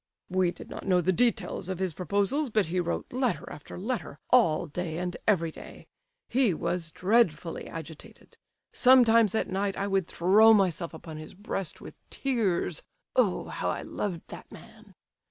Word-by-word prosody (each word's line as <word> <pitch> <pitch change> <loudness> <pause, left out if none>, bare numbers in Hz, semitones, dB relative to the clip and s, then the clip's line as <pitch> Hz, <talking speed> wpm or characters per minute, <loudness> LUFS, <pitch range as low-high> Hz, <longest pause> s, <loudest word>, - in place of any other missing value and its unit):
"We 185 -1 +2
did - - -9
not - - -7
know 185 -2 +4
the 180 +2 +2
details 230 -4 0
of 185 - -2
his 185 -2 -2
proposals, 205 - 0
but 215 -3 +2
he 180 +3 -2
wrote 175 +5 -3
letter 255 -2 -1
after 150 - -10
letter, 195 - -4
all 175 -11 +4
day 165 +1 -4
and 180 0 -3
every 170 -6 +2
day. - - -12 0.4
He 240 -8 +2
was 170 +1 -2
dreadfully 180 -4 +1
agitated. 160 -1 -10 0.3
Sometimes 230 -5 +5
at - - 0
night 195 +1 -2
I 200 - -1
would 195 -3 0
throw 215 +6 +5
myself 175 -4 0
upon 160 -1 -9
his 155 +2 -10
breast 195 -3 -5
with - - -11
tears 230 - -1 0.3
(Oh, - - +1
how - - -2
I - - -3
loved 180 -5 -4
that - - -10
man!). - - -15
185 Hz, 165 wpm, -28 LUFS, 170-220 Hz, 0.4 s, Sometimes